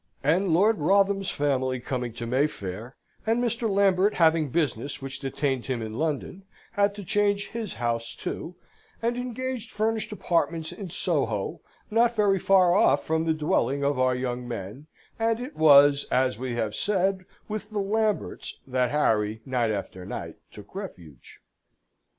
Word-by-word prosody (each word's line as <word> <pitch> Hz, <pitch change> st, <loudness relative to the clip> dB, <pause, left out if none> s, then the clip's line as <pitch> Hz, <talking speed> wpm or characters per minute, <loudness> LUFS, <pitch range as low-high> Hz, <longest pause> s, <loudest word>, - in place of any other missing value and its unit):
And 170 Hz, +8 st, +2 dB
Lord 200 Hz, +5 st, +4 dB
Wrotham's 195 Hz, +4 st, +2 dB
family 130 Hz, -3 st, 0 dB
coming 125 Hz, -1 st, -3 dB
to 115 Hz, 0 st, -5 dB
Mayfair, 115 Hz, -4 st, -2 dB, 0.3 s
and 225 Hz, +1 st, +1 dB
Mr. 235 Hz, -1 st, 0 dB
Lambert 195 Hz, 0 st, +3 dB
having 160 Hz, -3 st, +3 dB
business 140 Hz, -2 st, -1 dB
which 135 Hz, -1 st, -7 dB
detained 135 Hz, -1 st, -2 dB
him 125 Hz, -4 st, -2 dB
in 110 Hz, -1 st, -5 dB
London, 155 Hz, -, -2 dB, 0.3 s
had 200 Hz, 0 st, +1 dB
to 205 Hz, -, -7 dB
change 205 Hz, +2 st, +1 dB
his 225 Hz, -, -5 dB
house, 115 Hz, 0 st, -2 dB
too, 175 Hz, -, -5 dB, 0.5 s
and 235 Hz, +1 st, +1 dB
engaged 250 Hz, -1 st, -4 dB
furnished 220 Hz, +1 st, -1 dB
apartments 170 Hz, -5 st, -1 dB
in 195 Hz, -4 st, -7 dB
Soho, 135 Hz, -, -1 dB, 0.3 s
not 235 Hz, +2 st, +3 dB
very 200 Hz, -3 st, +3 dB
far 185 Hz, -2 st, +4 dB
off 145 Hz, -7 st, +3 dB
from 160 Hz, 0 st, 0 dB
the 160 Hz, -, +2 dB
dwelling 140 Hz, -3 st, 0 dB
of 140 Hz, -2 st, +1 dB
our 130 Hz, 0 st, +3 dB
young 125 Hz, -1 st, -3 dB
men; 115 Hz, +5 st, -7 dB, 0.3 s
and 225 Hz, 0 st, +1 dB
it 255 Hz, +4 st, -7 dB
was, 145 Hz, -2 st, +6 dB
as 130 Hz, -2 st, +2 dB
we 125 Hz, +1 st, -4 dB
have 110 Hz, -3 st, -1 dB
said, 190 Hz, -, 0 dB, 0.2 s
with 215 Hz, -1 st, -5 dB
the 215 Hz, -, -5 dB
Lamberts 210 Hz, +1 st, -1 dB
that 125 Hz, -1 st, 0 dB
Harry, 110 Hz, -6 st, +1 dB
night 125 Hz, -3 st, 0 dB
after 95 Hz, -3 st, -4 dB
night, -, -, -6 dB
took 105 Hz, -1 st, -13 dB
refuge. 90 Hz, -, -10 dB
155 Hz, 155 wpm, -26 LUFS, 125-200 Hz, 0.5 s, was